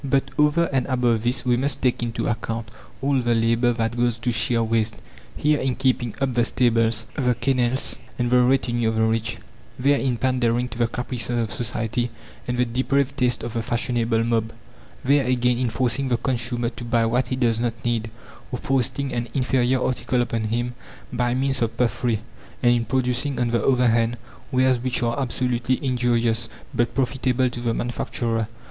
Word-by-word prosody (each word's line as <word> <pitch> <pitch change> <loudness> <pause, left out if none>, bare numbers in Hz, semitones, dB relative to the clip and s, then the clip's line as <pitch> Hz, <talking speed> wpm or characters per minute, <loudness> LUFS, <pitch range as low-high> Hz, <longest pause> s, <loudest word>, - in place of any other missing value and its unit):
But 135 0 0
over 150 +3 +3
and 130 -2 +1
above 125 -4 +2
this 125 +2 -1
we 120 -1 +3
must 135 +1 -1
take 125 -2 +2
into 115 -1 -2
account 115 0 -3 0.3
all 135 -1 +2
the 120 -1 +1
labour 115 +2 +2
that 115 0 -1
goes 120 -1 +1
to 120 +2 -1
sheer 115 +1 +1
waste, 110 -1 0 0.4
here, 150 0 +2
in 130 -1 0
keeping 130 -4 0
up 135 -2 0
the 120 0 +3
stables, 115 -2 +1
the 125 -4 +1
kennels, 130 +1 0 0.2
and 120 -1 0
the 125 0 +6
retinue 120 -2 +2
of 110 - -2
the 110 - +2
rich; 110 0 0 0.4
there, 140 +2 +3
in 130 -3 0
pandering 125 -1 +1
to 120 0 -9
the 120 - +3
caprices 120 0 -3
of 115 -2 -1
society 120 +1 -2 0.4
and 125 0 -1
the 125 - +3
depraved 135 +3 0
tastes 125 -4 +1
of 115 -1 -5
the 115 - -1
fashionable 115 -1 0
mob; 115 -1 0 0.5
there 140 +1 +4
again, 125 -1 +1
in 125 -2 +1
forcing 125 +3 0
the 120 -2 +1
consumer 120 -1 -1
to 120 - -9
buy 115 -1 +2
what 125 +3 +1
he 130 - -1
does 120 -3 +1
not 120 -1 -1
need, 115 -1 0 0.4
or 125 - -2
foisting 135 +1 -1
an 120 -1 -2
inferior 130 -1 +2
article 125 0 0
upon 115 -2 -2
him 120 +3 -1 0.4
by 120 0 +1
means 135 0 0
of 115 -1 -1
puffery, 120 -2 0 0.4
and 120 0 +6
in 120 -1 +1
producing 130 +3 0
on 120 -1 +1
the 115 -2 +1
other 125 -2 +4
hand 115 +1 +1 0.3
wares 130 -1 +3
which 125 0 -1
are 120 +3 0
absolutely 125 -1 0
injurious, 120 -2 +1 0.2
but 120 0 0
profitable 130 -1 +1
to 120 - -6
the 120 -1 0
manufacturer. 115 -2 -2
120 Hz, 185 wpm, -23 LUFS, 115-130 Hz, 0.5 s, the